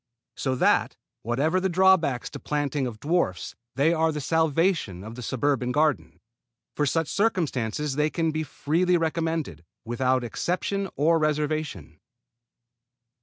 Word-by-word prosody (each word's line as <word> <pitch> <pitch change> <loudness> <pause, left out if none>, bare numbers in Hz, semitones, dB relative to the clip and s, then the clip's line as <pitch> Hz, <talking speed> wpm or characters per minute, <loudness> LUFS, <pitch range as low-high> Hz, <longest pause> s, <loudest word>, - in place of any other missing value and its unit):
So 130 -2 -1
that, - - +2 0.2
whatever 140 +10 +1
the 190 +1 0
drawbacks 175 -8 +3
to - - -7
the - - -30
planting 145 -2 -1
of 110 -3 -7
dwarfs, 150 - -1 0.2
they 150 +5 +3
are 160 -1 +2
the 150 - -4
salvation 160 - +1
of 110 +2 -8
the 125 - -8
suburban 130 +1 0
garden. 150 +2 0 0.6
For 145 - +1
such 165 +3 0
circumstances 150 - -1
they 150 +1 +2
can 165 0 0
be 155 0 -2
freely 165 +4 +1
recommended, 160 - -2 0.2
without 130 +2 +1
exception 185 - -2
or 165 +3 +3
reservation. 150 - -2
150 Hz, 135 wpm, -26 LUFS, 130-165 Hz, 0.6 s, drawbacks